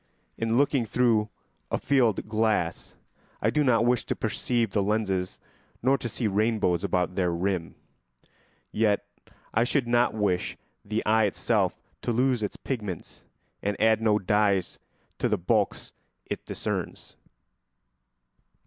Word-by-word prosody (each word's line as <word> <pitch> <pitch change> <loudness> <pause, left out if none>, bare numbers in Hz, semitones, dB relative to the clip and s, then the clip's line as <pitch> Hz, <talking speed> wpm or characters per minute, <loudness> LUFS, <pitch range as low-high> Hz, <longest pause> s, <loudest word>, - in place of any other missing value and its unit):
In 115 +1 0
looking 140 -2 +3
through 115 -2 +2 0.4
a - - 0
field 120 -9 +2
glass 110 0 0 0.4
I - - +1
do 150 - +2
not 115 -4 +3
wish 125 -1 +2
to - - -2
perceive 115 0 -1
the 100 - +1
lenses 95 -3 -1 0.4
nor 135 +2 +4
to 120 - -4
see 115 - -3
rainbows 105 -4 +1
about 90 -2 0
their 90 -2 +1
rim; 85 0 -2 1.0
yet 105 -2 +1 0.5
I 115 - +3
should 130 +1 +1
not 120 -1 +2
wish 100 -4 0 0.3
the 105 +2 -2
eye 110 0 +4
itself 100 - 0 0.2
to - - -1
lose 125 0 +2
its 105 - -3
pigments 105 - -5 0.4
and 100 0 -2
add 110 0 +4
no 110 -2 +3
dyes 100 -1 +1 0.4
to - - +1
the - - +2
bulks 100 +3 0 0.3
it - - -5
discerns. - - -4
110 Hz, 135 wpm, -27 LUFS, 100-120 Hz, 1.0 s, nor